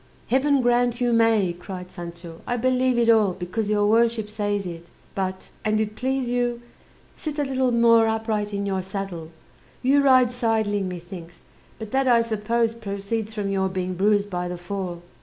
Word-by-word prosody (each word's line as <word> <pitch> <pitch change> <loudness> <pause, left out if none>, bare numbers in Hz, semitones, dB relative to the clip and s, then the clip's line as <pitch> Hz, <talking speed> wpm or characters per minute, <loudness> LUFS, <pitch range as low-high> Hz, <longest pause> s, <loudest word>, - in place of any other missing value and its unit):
"Heaven 275 +2 +3
grant 245 0 +2
you 245 -1 +1
may," 225 -6 +3
cried 180 +1 -8
Sancho; 170 -1 -9
"I 245 - 0
believe 255 +1 +2
it 235 -1 +3
all, 215 -5 +4
because 190 +4 -3
your 205 -1 +2
worship 225 0 +2
says 205 -2 -1
it. 170 -1 -8 0.2
But, 190 -1 -4
an't 215 0 0
please 260 +2 -1
you, 240 0 -1 0.5
sit 305 -1 -5
a 295 - +1
little 260 -2 0
more 230 -1 +5
upright 220 -2 -1
in 200 0 -2
your 190 -1 -1
saddle; 190 -4 -6 0.5
you 275 +3 +4
ride 255 -3 +5
sideling 220 -5 0
methinks; 175 -1 -9 0.3
but 220 -2 -8
that, 270 0 +1
I 235 -2 +5
suppose, 230 +1 0
proceeds 215 0 -4
from 205 -2 -2
your 190 -1 0
being 185 0 -3
bruised 205 +2 +1
by 180 0 -2
the 180 0 -5
fall." 175 -1 -5
215 Hz, 170 wpm, -24 LUFS, 190-240 Hz, 0.5 s, more